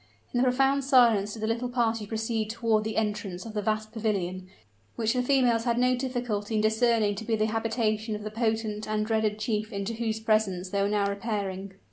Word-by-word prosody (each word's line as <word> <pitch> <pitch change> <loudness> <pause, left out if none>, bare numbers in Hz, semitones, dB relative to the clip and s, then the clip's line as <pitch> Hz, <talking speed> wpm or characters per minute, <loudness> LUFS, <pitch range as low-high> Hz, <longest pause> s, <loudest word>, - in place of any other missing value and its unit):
In 245 - +2
profound 270 +2 +3
silence 235 -6 +4
did 220 - -7
the - - +1
little 235 +2 -1
party 230 -3 0
proceed 220 0 -2
toward 225 -1 +1
the 220 0 -3
entrance 210 -4 -2
of 225 - -7
the 210 - -1
vast 215 +1 -1
pavilion, 190 -5 -2 0.5
which 225 -1 +1
the 250 - +1
females 245 -3 +2
had 235 -1 +1
no 250 +1 +3
difficulty 245 -5 -2
in 215 - +2
discerning 220 -1 +2
to 205 +2 -6
be 225 0 0
the 215 0 +1
habitation 220 -1 -1
of 210 - -7
the 215 - -5
potent 220 -1 -1
and 215 0 0
dreaded 220 -1 0
chief 215 0 -2
into 200 +2 -3
whose 220 -1 -2
presence 210 -5 0
they 200 - +1
were 200 - +1
now 205 -1 +1
repairing. 200 -2 -3
220 Hz, 200 wpm, -27 LUFS, 210-230 Hz, 0.5 s, silence